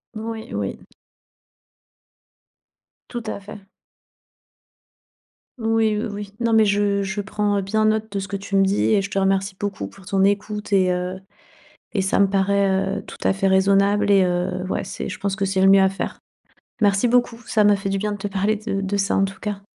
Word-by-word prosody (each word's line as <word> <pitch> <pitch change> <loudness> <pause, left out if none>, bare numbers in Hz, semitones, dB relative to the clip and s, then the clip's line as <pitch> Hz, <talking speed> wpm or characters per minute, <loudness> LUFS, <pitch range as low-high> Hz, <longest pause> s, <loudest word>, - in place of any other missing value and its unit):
Oui, 220 0 -6
oui. - - -3 2.3
Tout 240 -2 -5
à - - -4
fait. 200 0 -11 1.9
Oui, 225 -1 +1
oui, 215 - -2
oui, 205 0 -7
non, 230 -1 0
mais 220 -1 +5
je 200 0 +1
je 195 +1 -3
prends 205 0 -1
bien 215 +3 0
note 220 0 0
de 200 - -3
ce 195 - -5
que 200 - -4
tu 195 0 -5
me 195 0 +5
dis 195 +1 +1
et 195 - +2
je 195 - -6
te 195 - 0
remercie 195 0 0
beaucoup 205 -1 -3
pour 195 -1 -16
ton 195 -1 +1
écoute 205 +1 -1
et 185 -2 +4
heu, 180 +1 -3 0.7
et 205 - 0
ça 190 0 +1
me 200 - +6
paraît, 195 0 +1
heu, - - -13
tout - - -11
à - - +2
fait 195 0 +1
raisonnable 200 +2 +3
et 195 -2 +5
heu, 180 +1 -1
ouais - - -1
c'est - - -6
je - - -6
pense 200 0 -1
que 195 - -1
c'est 195 -1 0
le 190 - +5
mieux 195 0 +7
à 190 - +4
faire. 195 - -5 0.6
Merci 200 +3 +3
beaucoup 240 -1 +1
ça 215 -2 +2
m'a 205 -1 +5
fait 195 - -5
du 195 0 -1
bien 210 +1 -2
de 205 - -4
te 205 - -4
parler 200 +2 0
de 195 -2 -3
de 195 +1 -1
ça 195 0 +1
en 195 - +3
tout 195 0 -4
cas. 200 -2 -5
200 Hz, 205 wpm, -22 LUFS, 195-210 Hz, 2.3 s, mieux